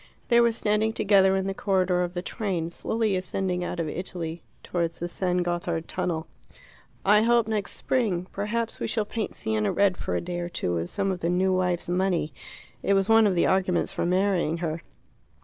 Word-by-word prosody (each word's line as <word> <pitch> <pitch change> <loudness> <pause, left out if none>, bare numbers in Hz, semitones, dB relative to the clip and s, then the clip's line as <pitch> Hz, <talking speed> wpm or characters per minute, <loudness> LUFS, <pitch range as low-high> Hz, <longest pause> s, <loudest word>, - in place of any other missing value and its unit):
They 235 -1 +6
were 235 0 +4
standing 220 0 +1
together 195 -3 +4
in 190 0 0
the 195 - -1
corridor 185 -2 +1
of 175 0 -3
the 175 - -3
train, 180 -6 -2
slowly 220 +2 0
ascending 185 -1 -2
out 175 - -4
of 165 - -1
Italy 170 0 -4 0.2
towards 170 -2 -2
the 175 - -3
San 180 0 0
Gothard 175 -1 -2
tunnel. 160 -3 -2 0.8
"I 210 +2 +6
hope 235 0 +3
next 215 -2 -2
spring. 205 -9 0
Perhaps 225 +3 -2
we - - -2
shall 220 -2 -1
paint 220 0 -4
Siena 110 -1 0
red 200 -2 +2
for - - -3
a - - +1
day 175 0 -4
or 175 0 -3
two 90 - -2
with 85 0 -2
some 195 -1 -1
of 185 - -3
the 170 - -1
new 185 +2 +2
wife's 180 -2 0
money. 180 -4 0 0.5
It 200 - +2
was 195 +2 +1
one 225 -1 +6
of 190 - +1
the 170 - +3
arguments 185 -2 +1
for - - -1
marrying 180 -3 +1
her." 165 -1 -3
185 Hz, 200 wpm, -26 LUFS, 175-205 Hz, 0.8 s, They